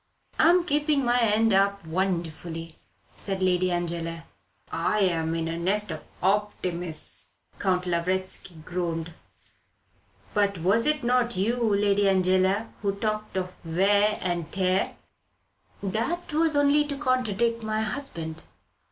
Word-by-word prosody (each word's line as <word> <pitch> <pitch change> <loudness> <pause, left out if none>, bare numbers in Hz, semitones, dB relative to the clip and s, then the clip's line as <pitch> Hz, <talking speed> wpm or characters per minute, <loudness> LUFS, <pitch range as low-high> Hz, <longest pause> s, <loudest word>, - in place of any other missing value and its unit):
"I 320 - +6
am 355 0 +5
keeping 295 -3 +1
my 240 0 +3
end 225 -1 +3
up 200 -1 +2
wonderfully," 165 -2 -3 0.4
said 195 -1 -3
Lady 185 0 +2
Angela. 170 -1 -2 0.5
"I 190 +6 0
am 165 -3 +1
in 165 -1 -1
a 165 +1 -3
nest 200 +3 0
of 155 - -5 0.2
optimists," 180 - -1 0.2
Count 185 -2 +1
Lavretsky 185 +1 -2
groaned. 170 -2 -3 1.2
"But 200 -2 +2
was 195 - +2
it 300 -3 +1
not 240 -3 +1
you, 225 +2 +1
Lady 200 0 +3
Angela, 190 +3 +2
who 200 -1 0
talked 215 -1 -3
of 185 -1 -3
wear 200 +5 +3
and 175 -3 -2
tear. 185 -1 0 0.9
"That 265 - -2
was 315 0 +2
only 285 +1 +4
to 285 -1 -4
contradict 235 -4 0
my 215 0 -1
husband." 170 - -4
195 Hz, 125 wpm, -26 LUFS, 175-225 Hz, 1.2 s, I